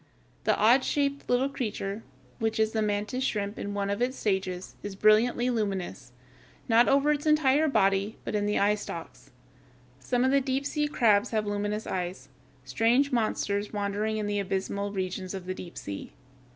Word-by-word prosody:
The -, -, +3 dB
odd 240 Hz, +5 st, +5 dB
shaped 280 Hz, -1 st, -1 dB
little 245 Hz, +2 st, +3 dB
creature, 215 Hz, -6 st, -4 dB, 0.4 s
which 220 Hz, 0 st, -1 dB
is 220 Hz, 0 st, +2 dB
the 220 Hz, -, 0 dB
mantis 210 Hz, +4 st, -1 dB
shrimp 205 Hz, -4 st, -2 dB
in 205 Hz, 0 st, -4 dB
one 200 Hz, 0 st, -1 dB
of 200 Hz, +3 st, -2 dB
its 255 Hz, +2 st, 0 dB
stages, 190 Hz, -3 st, -2 dB
is 205 Hz, -1 st, -6 dB
brilliantly 230 Hz, +4 st, +3 dB
luminous, 190 Hz, -, -3 dB, 0.6 s
not 235 Hz, +1 st, +5 dB
over 280 Hz, +2 st, +4 dB
its 295 Hz, +1 st, -1 dB
entire 305 Hz, 0 st, +4 dB
body, 195 Hz, -4 st, +1 dB
but -, -, -3 dB
in 205 Hz, -1 st, 0 dB
the 210 Hz, -, +1 dB
eyestalks. 200 Hz, -9 st, -2 dB, 0.7 s
Some 245 Hz, -, 0 dB
of 260 Hz, -, +3 dB
the 275 Hz, 0 st, +4 dB
deep 265 Hz, +1 st, -1 dB
sea 295 Hz, +1 st, 0 dB
crabs 215 Hz, -8 st, +3 dB
have 215 Hz, -2 st, 0 dB
luminous 205 Hz, +1 st, -2 dB
eyes, 180 Hz, -3 st, -4 dB, 0.4 s
strange 235 Hz, -, +2 dB
monsters 210 Hz, -3 st, -1 dB
wandering 205 Hz, +1 st, -1 dB
in 210 Hz, -, -2 dB
the 205 Hz, 0 st, -1 dB
abysmal 200 Hz, +1 st, -2 dB
regions 185 Hz, -1 st, -4 dB
of 190 Hz, -2 st, -7 dB
the 185 Hz, -, -3 dB
deep 180 Hz, -2 st, -10 dB
sea. 100 Hz, -1 st, -7 dB
210 Hz, 170 wpm, -28 LUFS, 200-245 Hz, 0.7 s, odd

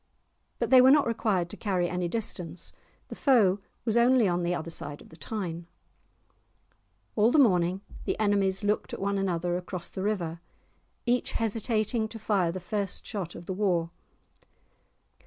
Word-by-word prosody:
But -, -, -2 dB
they 260 Hz, -1 st, +9 dB
were 260 Hz, -, +7 dB
not 290 Hz, +1 st, +6 dB
required 215 Hz, -6 st, 0 dB
to -, -, -6 dB
carry 185 Hz, -4 st, 0 dB
any 180 Hz, 0 st, -2 dB
distance, 175 Hz, -5 st, -3 dB, 0.4 s
the -, -, -6 dB
foe 210 Hz, -8 st, +4 dB, 0.3 s
was 225 Hz, -2 st, 0 dB
only 240 Hz, -1 st, +5 dB
on 175 Hz, -1 st, 0 dB
the 175 Hz, +1 st, 0 dB
other 165 Hz, 0 st, -5 dB
side 145 Hz, -2 st, -5 dB
of -, -, -16 dB
the 160 Hz, -, -14 dB
Tyne. 170 Hz, 0 st, -5 dB, 1.5 s
All 220 Hz, +2 st, +4 dB
the -, -, +3 dB
morning 185 Hz, -, +3 dB, 0.2 s
the -, -, -2 dB
enemies 200 Hz, -2 st, +2 dB
looked 210 Hz, +1 st, 0 dB
at -, -, -10 dB
one 200 Hz, 0 st, 0 dB
another 175 Hz, -2 st, 0 dB
across 180 Hz, -1 st, -5 dB
the 190 Hz, -, -6 dB
river, 175 Hz, -5 st, -2 dB, 0.6 s
each 245 Hz, +1 st, 0 dB
hesitating 220 Hz, 0 st, 0 dB
to 225 Hz, +1 st, -9 dB
fire 195 Hz, -5 st, +1 dB
the 185 Hz, -, -5 dB
first 195 Hz, +1 st, -3 dB
shot 190 Hz, -6 st, -5 dB
of -, -, -9 dB
the 190 Hz, -, -3 dB
war. 180 Hz, -4 st, 0 dB
195 Hz, 165 wpm, -28 LUFS, 175-220 Hz, 1.5 s, they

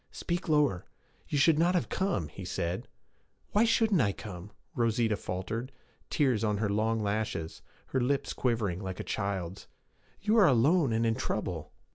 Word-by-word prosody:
'Speak 175 Hz, 0 st, -3 dB
lower. 145 Hz, -, +3 dB, 0.4 s
You 145 Hz, -, -1 dB
should 150 Hz, +2 st, +5 dB
not 175 Hz, +2 st, +3 dB
have 175 Hz, -, +1 dB
come,' 175 Hz, -, -1 dB
he 95 Hz, +6 st, -9 dB
said. 90 Hz, 0 st, -3 dB, 0.6 s
'Why 210 Hz, +3 st, +4 dB
shouldn't 220 Hz, -6 st, +3 dB
I 100 Hz, -4 st, +2 dB
come?' 95 Hz, -2 st, -8 dB, 0.2 s
Rosita 115 Hz, -2 st, +1 dB
faltered, 105 Hz, +8 st, -4 dB, 0.4 s
tears 130 Hz, -7 st, +2 dB
on 105 Hz, -2 st, +1 dB
her 105 Hz, 0 st, 0 dB
long 110 Hz, +1 st, +1 dB
lashes, 100 Hz, -6 st, -2 dB, 0.3 s
her 130 Hz, -, 0 dB
lips 140 Hz, +3 st, 0 dB
quivering 110 Hz, -8 st, 0 dB
like 95 Hz, -1 st, -5 dB
a -, -, -3 dB
child's. 95 Hz, -2 st, -3 dB, 0.5 s
'You 215 Hz, +3 st, +2 dB
are 195 Hz, -, +7 dB
alone 140 Hz, +3 st, +4 dB
and 115 Hz, +1 st, +1 dB
in 115 Hz, -, +3 dB
trouble.' 90 Hz, -9 st, -3 dB
115 Hz, 160 wpm, -30 LUFS, 100-145 Hz, 0.6 s, are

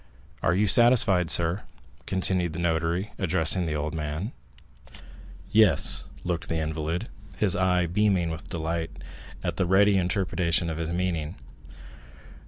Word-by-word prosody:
Are -, -, +1 dB
you 105 Hz, +3 st, +2 dB
satisfied, 105 Hz, -5 st, +5 dB
sir?" 85 Hz, +4 st, +2 dB, 0.5 s
continued 90 Hz, -3 st, 0 dB
the 85 Hz, -, -5 dB
notary, 85 Hz, +3 st, -1 dB
addressing 90 Hz, -1 st, +1 dB
the 75 Hz, -, -2 dB
old 75 Hz, 0 st, -3 dB
man. 80 Hz, +7 st, -4 dB, 0.6 s
30175m -, -, -23 dB, 0.6 s
"Yes," 105 Hz, -13 st, +4 dB, 0.2 s
looked 90 Hz, -1 st, -3 dB
the 80 Hz, -, -2 dB
invalid, 80 Hz, +5 st, -3 dB, 0.3 s
his 100 Hz, -4 st, +2 dB
eye 90 Hz, -1 st, +1 dB
beaming 90 Hz, -1 st, +1 dB
with 80 Hz, 0 st, -8 dB
delight 80 Hz, 0 st, -3 dB, 0.5 s
at -, -, -3 dB
the 95 Hz, -, 0 dB
ready 100 Hz, +2 st, +4 dB
interpretation 90 Hz, -2 st, 0 dB
of 80 Hz, -, -5 dB
his 80 Hz, 0 st, -3 dB
meaning. 85 Hz, -2 st, -2 dB
85 Hz, 135 wpm, -26 LUFS, 80-95 Hz, 0.6 s, satisfied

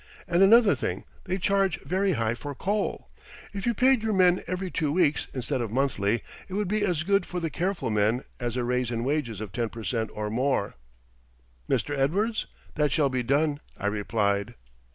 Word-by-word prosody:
And 175 Hz, 0 st, +2 dB
another 215 Hz, +1 st, +7 dB
thing, -, -, -3 dB, 0.2 s
they 185 Hz, 0 st, -1 dB
charge 195 Hz, 0 st, +1 dB
very 190 Hz, +1 st, +1 dB
high 115 Hz, -4 st, 0 dB
for 140 Hz, +4 st, -6 dB
coal. 200 Hz, +7 st, -2 dB, 0.4 s
If 200 Hz, +2 st, -4 dB
you 235 Hz, -, +2 dB
paid 260 Hz, 0 st, +4 dB
your 220 Hz, -1 st, 0 dB
men 180 Hz, -1 st, +4 dB
every 185 Hz, 0 st, -3 dB
two 150 Hz, -3 st, 0 dB
weeks, 155 Hz, -3 st, +2 dB
instead 130 Hz, 0 st, -2 dB
of 115 Hz, -, -2 dB
monthly, 115 Hz, -4 st, 0 dB, 0.3 s
it 190 Hz, -, -5 dB
would 205 Hz, -1 st, 0 dB
be 210 Hz, +2 st, 0 dB
as 175 Hz, -6 st, 0 dB
good 200 Hz, +3 st, +2 dB
for 180 Hz, -, -4 dB
the 165 Hz, -2 st, -3 dB
careful 180 Hz, -, -1 dB
men 110 Hz, +4 st, +2 dB, 0.2 s
as 120 Hz, -1 st, -2 dB
a 125 Hz, -, 0 dB
raise 125 Hz, 0 st, 0 dB
in 115 Hz, -1 st, -2 dB
wages 130 Hz, -6 st, -1 dB
of 105 Hz, -3 st, -6 dB
ten 115 Hz, +3 st, -1 dB
per 115 Hz, 0 st, -8 dB
cent 110 Hz, -1 st, -1 dB
or 105 Hz, 0 st, -3 dB
more." 125 Hz, -3 st, 0 dB, 1.0 s
"Mr. 145 Hz, -, 0 dB
Edwards, 200 Hz, +12 st, 0 dB, 0.3 s
that 150 Hz, -2 st, +1 dB
shall 140 Hz, 0 st, +3 dB
be 130 Hz, -1 st, -1 dB
done," 145 Hz, +4 st, +1 dB, 0.2 s
I -, -, -6 dB
replied. 105 Hz, +1 st, 0 dB
145 Hz, 195 wpm, -27 LUFS, 115-190 Hz, 1.0 s, another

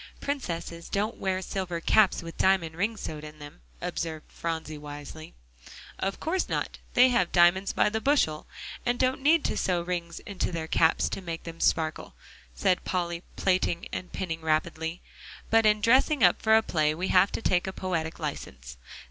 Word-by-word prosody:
"Princesses 170 Hz, -11 st, -4 dB
don't 210 Hz, +3 st, -1 dB
wear 190 Hz, -1 st, -1 dB
silver 180 Hz, -3 st, -3 dB
caps 195 Hz, +2 st, +3 dB
with 165 Hz, 0 st, -8 dB
diamond 180 Hz, -4 st, +2 dB
rings 210 Hz, +5 st, -1 dB
sewed 155 Hz, -1 st, -6 dB
in 155 Hz, 0 st, -10 dB
them," 145 Hz, -, -12 dB, 0.2 s
observed 160 Hz, -2 st, -4 dB
Phronsie 160 Hz, -2 st, -4 dB
wisely. 145 Hz, +2 st, -9 dB, 0.6 s
"Of 195 Hz, 0 st, -2 dB
course 355 Hz, +4 st, -1 dB
not; -, -, -3 dB, 0.2 s
they 255 Hz, +1 st, +7 dB
have 185 Hz, -8 st, +1 dB
diamonds 180 Hz, +2 st, +4 dB
by -, -, +2 dB
the 220 Hz, +1 st, -2 dB
bushel, 245 Hz, -, +1 dB, 0.4 s
and 245 Hz, 0 st, 0 dB
don't 260 Hz, +1 st, +1 dB
need 310 Hz, +3 st, +4 dB
to -, -, 0 dB
sew 175 Hz, -2 st, 0 dB
rings 170 Hz, -1 st, -4 dB
in 200 Hz, -2 st, -10 dB
their 165 Hz, -2 st, -1 dB
caps 160 Hz, 0 st, +3 dB
to -, -, -4 dB
make 165 Hz, -2 st, -6 dB
them 165 Hz, 0 st, -8 dB
sparkle," 160 Hz, -2 st, 0 dB, 0.4 s
said 180 Hz, -, +1 dB
Polly, 175 Hz, -2 st, -2 dB
plaiting 180 Hz, -2 st, 0 dB
and 180 Hz, -, -5 dB
pinning 165 Hz, -3 st, -4 dB
rapidly, 160 Hz, +1 st, -1 dB, 0.5 s
"but 225 Hz, -1 st, +5 dB
in 210 Hz, 0 st, +3 dB
dressing 260 Hz, +6 st, +4 dB
up -, -, +5 dB
for 220 Hz, 0 st, +5 dB
a 220 Hz, -, +2 dB
play, 155 Hz, -4 st, +1 dB
we 185 Hz, +3 st, -2 dB
have 185 Hz, +2 st, +5 dB
to -, -, -3 dB
take 180 Hz, 0 st, +2 dB
a -, -, -2 dB
poetic 170 Hz, -4 st, -3 dB
license. 65 Hz, -1 st, -6 dB
175 Hz, 175 wpm, -27 LUFS, 160-205 Hz, 0.6 s, they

